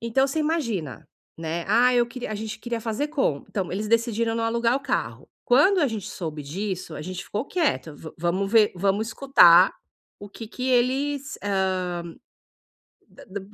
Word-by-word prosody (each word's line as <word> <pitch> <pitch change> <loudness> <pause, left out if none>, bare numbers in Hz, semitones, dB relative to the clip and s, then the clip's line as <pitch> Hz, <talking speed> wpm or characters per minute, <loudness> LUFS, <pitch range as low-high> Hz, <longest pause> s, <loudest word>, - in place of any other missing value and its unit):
Então, 235 +4 +1
você 275 +3 -3
imagina, 230 - -2 0.3
né: 165 +1 -3
"Ah, 245 +4 +4
eu 240 -1 +3
queria 245 0 -7
a - - -3
gente 215 +1 -5
queria 240 -1 -4
fazer 230 +6 -2
com" 270 - -1
Então, 190 -4 -3
eles 210 +3 -3
decidiram 230 0 +1
não 230 0 -1
alugar 235 +1 +1
o - - -4
carro. 290 - -3 0.2
Quando 300 +11 +4
a 295 - +3
gente 215 -4 -5
soube 155 -4 -6
disso, 180 +3 -5
a 150 - -6
gente 185 +2 -6
ficou 210 +4 -3
quieto, 295 - -1
vam 160 +2 -10
vamos 180 +4 -1
ver, 220 -2 +5
vamos 200 +4 0
escutar 190 -10 +6 0.5
o 205 - -10
que 225 +3 -9
que 255 +3 -4
eles, 270 +4 0
hã, 185 -3 -1 1.1
da - - -16
da 200 +2 -6
b 190 - -13
220 Hz, 180 wpm, -24 LUFS, 185-250 Hz, 1.1 s, escutar